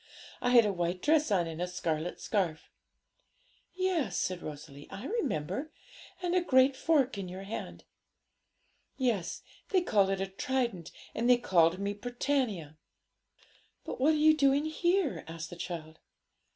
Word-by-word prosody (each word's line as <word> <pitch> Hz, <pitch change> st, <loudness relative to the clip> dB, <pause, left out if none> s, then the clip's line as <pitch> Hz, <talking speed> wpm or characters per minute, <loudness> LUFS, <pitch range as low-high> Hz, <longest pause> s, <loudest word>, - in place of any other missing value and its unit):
I 245 Hz, -, +1 dB
had 240 Hz, -2 st, +7 dB
a 205 Hz, -, +1 dB
white 175 Hz, 0 st, -1 dB
dress 305 Hz, -, +3 dB
on 185 Hz, -5 st, +2 dB
and 165 Hz, 0 st, -6 dB
a 180 Hz, -, 0 dB
scarlet 170 Hz, -2 st, -3 dB
scarf.' 180 Hz, -7 st, -2 dB, 1.0 s
'Yes,' 350 Hz, -, 0 dB
said 180 Hz, -1 st, -1 dB
Rosalie, 145 Hz, -1 st, -9 dB
'I 200 Hz, -, -8 dB
remember; 280 Hz, -, -2 dB, 0.5 s
and 350 Hz, 0 st, 0 dB
a 365 Hz, -, +3 dB
great 260 Hz, -4 st, +4 dB
fork 275 Hz, -6 st, +2 dB
in 185 Hz, -2 st, -5 dB
your 185 Hz, +2 st, -7 dB
hand.' 200 Hz, +3 st, -6 dB, 1.1 s
'Yes; 230 Hz, -10 st, -1 dB, 0.3 s
they 375 Hz, -2 st, +3 dB
called 200 Hz, -, +3 dB
it 195 Hz, -1 st, 0 dB
a 195 Hz, -, 0 dB
trident, 200 Hz, -3 st, -2 dB, 0.2 s
and 235 Hz, +2 st, 0 dB
they 250 Hz, -, +7 dB
called 175 Hz, -7 st, +3 dB
me 200 Hz, +1 st, -2 dB
Britannia.' 220 Hz, -, -2 dB, 1.1 s
'But -, -, -6 dB
what 305 Hz, +4 st, +5 dB
are -, -, +1 dB
you 310 Hz, +1 st, +6 dB
doing 280 Hz, 0 st, +3 dB
here?' 345 Hz, +1 st, 0 dB
asked 165 Hz, 0 st, -7 dB
the -, -, -7 dB
child. 165 Hz, -2 st, -6 dB
205 Hz, 150 wpm, -31 LUFS, 175-280 Hz, 1.1 s, had